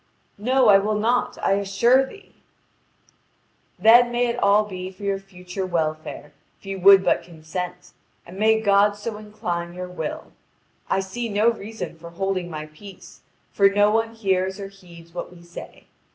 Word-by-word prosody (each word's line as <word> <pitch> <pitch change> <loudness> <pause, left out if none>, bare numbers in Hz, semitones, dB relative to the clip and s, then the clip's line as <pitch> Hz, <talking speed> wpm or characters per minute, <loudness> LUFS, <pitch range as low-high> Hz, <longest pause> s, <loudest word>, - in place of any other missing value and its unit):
"No, 255 +3 +3
I 195 -1 +8
will 210 +2 -1
not, 235 +4 0
I - - +2
assure 200 +7 +3
thee." 400 +10 -12 1.4
"Then 235 +5 +6
may 240 +1 +1
it 235 +1 -3
all 200 +1 +4
be 185 -2 -6
for 190 +2 -14
your 200 -1 -1
future 185 -1 -7
welfare 155 -3 -3 0.3
if - - -23
you 195 0 -5
would 195 +1 +7
but - - +2
consent, 180 +2 -7 0.3
and 185 +3 -11
may 220 +1 +4
God 205 0 +4
so 210 +1 -6
incline 175 -5 -5
your 180 0 -6
will! 160 -4 -6 0.6
I 195 - +1
see 230 +5 -5
no 215 +3 +3
reason 220 -6 -7
for 170 +1 -10
holding 185 0 -2
my 155 -2 -6
peace, 180 +6 -14 0.3
for 200 -1 +4
no 205 +1 +3
one 225 +1 0
hears 190 -2 -1
or 195 -1 -6
heeds 170 -4 -16
what 175 - -6
we 175 -1 -15
say. 170 0 -11
195 Hz, 165 wpm, -23 LUFS, 180-215 Hz, 1.4 s, I